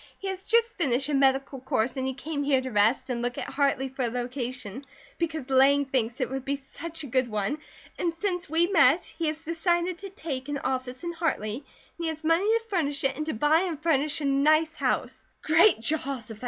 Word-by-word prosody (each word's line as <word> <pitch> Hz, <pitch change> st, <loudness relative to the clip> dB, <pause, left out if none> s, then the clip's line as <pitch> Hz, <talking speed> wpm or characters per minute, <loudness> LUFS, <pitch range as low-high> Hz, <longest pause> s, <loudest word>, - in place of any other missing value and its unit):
He 390 Hz, -, -4 dB
has 380 Hz, 0 st, -6 dB
just 465 Hz, 0 st, +2 dB
finished 275 Hz, -4 st, +1 dB
a -, -, -1 dB
medical 270 Hz, 0 st, +2 dB
course 250 Hz, -1 st, 0 dB
and 260 Hz, -1 st, -2 dB
he 265 Hz, -, -3 dB
came 290 Hz, +1 st, -4 dB
here 280 Hz, -2 st, +3 dB
to 260 Hz, 0 st, -5 dB
rest 220 Hz, +5 st, +2 dB
and 235 Hz, -1 st, -2 dB
look 245 Hz, 0 st, -2 dB
at -, -, -4 dB
Hartley 275 Hz, -1 st, +1 dB
for 265 Hz, 0 st, -6 dB
a 245 Hz, -, +2 dB
location, 245 Hz, -1 st, -5 dB, 0.4 s
because 315 Hz, -5 st, -2 dB
Lang 275 Hz, +2 st, +5 dB
thinks 250 Hz, -2 st, -1 dB
it 255 Hz, -, 0 dB
would 265 Hz, -1 st, -3 dB
be 280 Hz, +1 st, -1 dB
such 315 Hz, +4 st, -8 dB
a -, -, -5 dB
good 255 Hz, -1 st, 0 dB
one. 215 Hz, +7 st, -1 dB, 0.4 s
And 345 Hz, -, +1 dB
since 355 Hz, -2 st, -2 dB
we 325 Hz, +2 st, +3 dB
met 330 Hz, -4 st, +4 dB
he 330 Hz, -, -4 dB
has 310 Hz, +1 st, -3 dB
decided 345 Hz, +2 st, 0 dB
to 395 Hz, -, -7 dB
take 290 Hz, -8 st, -5 dB
an 290 Hz, -, -1 dB
office 255 Hz, +1 st, -3 dB
in 345 Hz, -, -2 dB
Hartley, 320 Hz, -11 st, -1 dB
and 285 Hz, -, -11 dB, 0.4 s
he 335 Hz, -, -2 dB
has 320 Hz, 0 st, -4 dB
money 330 Hz, +4 st, +3 dB
to 455 Hz, +1 st, +2 dB
furnish 300 Hz, -9 st, -1 dB
it, 270 Hz, -1 st, +1 dB
and 305 Hz, 0 st, -4 dB
to 315 Hz, -, -2 dB
buy 295 Hz, +7 st, +4 dB
and 345 Hz, -5 st, -2 dB
furnish 305 Hz, -1 st, +1 dB
a -, -, -2 dB
nice 310 Hz, +3 st, +3 dB
house." -, -, -1 dB, 0.2 s
"Great 325 Hz, -, +5 dB
Jehoshaphat!" 255 Hz, -5 st, -1 dB
285 Hz, 220 wpm, -27 LUFS, 260-330 Hz, 0.4 s, Lang